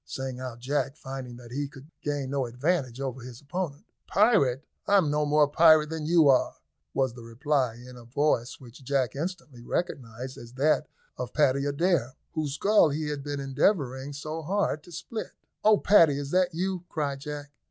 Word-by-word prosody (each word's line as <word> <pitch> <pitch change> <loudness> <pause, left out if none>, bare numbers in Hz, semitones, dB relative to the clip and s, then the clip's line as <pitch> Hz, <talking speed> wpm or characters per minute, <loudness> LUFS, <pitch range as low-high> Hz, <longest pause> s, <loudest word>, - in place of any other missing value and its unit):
sang 130 -1 -5
out 130 -2 -6
Jack, 140 +2 -1
finding 130 -4 -7
that 120 -1 -13
he 140 +3 -2
could 140 +2 -14
gain 145 -2 -2
no 135 -3 0
advantage 130 0 -1
over 135 -2 -4
his 120 -1 -9
opponent. 145 0 -4 0.2
"Pirate! 185 - +3 0.2
I'm 190 -7 +4
no 150 0 +1
more 150 0 +4
pirate 155 0 +5
than 160 -2 -3
you 165 -2 +5
are," 135 -2 +4 0.4
was 130 -3 +1
the 120 - -11
reply, 125 +1 0
in 125 +1 -12
a 120 - -12
voice 125 -1 0
which 130 +1 -14
Jack 135 -1 0
instantly 150 -5 -5
recognised 125 -3 -4
as 120 +1 -12
that 150 +3 +2 0.3
of 125 -1 -4
Paddy 140 -2 +3
Adair, 145 -4 +1 0.2
whose 155 -4 -2
skull 205 -2 +4
he 150 +1 -2
had 145 -1 -3
been 145 0 -4
endeavouring 135 -1 0
so 155 +3 -5
hard 180 -2 0
to 175 - -14
split. 180 +7 -6 0.3
"Oh! 215 0 +6
Paddy, 165 -10 +5
is 140 0 -5
that 180 -2 +2
you?" 185 0 -2
cried 145 -3 -2
Jack. 145 0 -7
145 Hz, 180 wpm, -27 LUFS, 130-155 Hz, 0.4 s, Oh